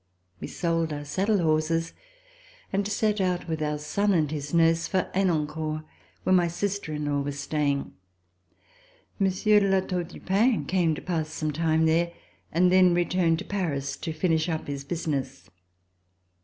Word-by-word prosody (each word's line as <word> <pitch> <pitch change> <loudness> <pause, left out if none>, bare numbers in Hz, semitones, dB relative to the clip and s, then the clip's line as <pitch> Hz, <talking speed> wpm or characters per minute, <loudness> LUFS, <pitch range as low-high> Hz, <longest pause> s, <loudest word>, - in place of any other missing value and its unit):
We - - -5
sold 165 -2 -1
our 145 0 -5
saddle 195 +8 +1
horses 165 +1 +1 0.8
and 200 +1 +1
set 210 0 0
out 180 -1 -1
with 160 -1 -3
our 150 0 -1
son 195 +7 0
and 155 -3 +1
his 145 -2 -4
nurse 165 0 +3
for 190 -2 -1
Henencourt 155 -4 0 0.4
where 185 - +2
my 175 -2 +4
sister 185 0 -3
in 150 0 -3
law 145 -1 0
was 140 0 -4
staying. 140 -1 -1 1.3
Monsieur 200 +2 +3
de 200 -1 +1
La 190 0 +4
Tour 180 -1 -2
du 170 - -12
Pin 200 - +2
came 170 -1 +1
to - - -8
pass 160 -4 -2
some 155 -1 -2
time 160 +1 +1
there 170 +2 +2 0.4
and 180 +2 +3
then 185 -1 +5
returned 175 -1 +2
to 190 - -6
Paris 155 -9 -2
to 165 - -4
finish 160 +1 0
up 160 -2 -2
his 140 -1 -5
business. 140 - -4
165 Hz, 165 wpm, -26 LUFS, 155-185 Hz, 1.3 s, then